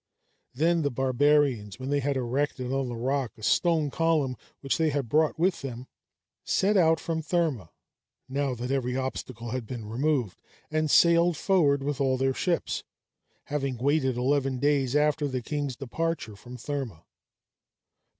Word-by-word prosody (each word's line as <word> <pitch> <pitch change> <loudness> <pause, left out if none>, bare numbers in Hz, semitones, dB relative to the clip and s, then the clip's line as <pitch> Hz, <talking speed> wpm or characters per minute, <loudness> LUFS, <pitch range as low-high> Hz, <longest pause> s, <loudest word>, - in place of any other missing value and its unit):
Then 165 +4 +2
the 145 - +1
barbarians, 130 -4 +2
when 130 +2 -5
they 145 - +2
had 140 0 0
erected 130 +1 -1
on 135 -2 -1
the 120 - -4
rock 130 +1 -1
a 110 - -14
stone 160 +2 +2
column, 155 -5 +1 0.3
which 135 +2 -1
they 160 -1 +3
had 140 -4 -1
brought 155 +6 +2
with 175 +2 +1
them, 125 -2 -6 0.6
set 200 +2 +2
out 165 -4 +4
from 160 -1 -2
Therma, 155 - -1 0.6
now 135 -1 -1
that 125 +2 -4
every 130 -2 0
obstacle 130 -3 -4
had 125 -3 -4
been 120 -3 -6
removed, 125 -1 -1 0.3
and 155 0 0
sailed 170 +1 +5
forward 150 -8 +2
with 145 0 -2
all 130 -1 +2
their 135 +1 +1
ships, 175 +4 -1 0.6
having 140 -3 -2
waited 130 0 +1
eleven 135 +1 +1
days 140 -1 +1
after 150 0 +2
the 130 -3 -3
king's 145 -1 -3
departure 140 -3 -3
from 125 +5 -11
Therma. 125 - -5
140 Hz, 155 wpm, -27 LUFS, 125-150 Hz, 0.6 s, sailed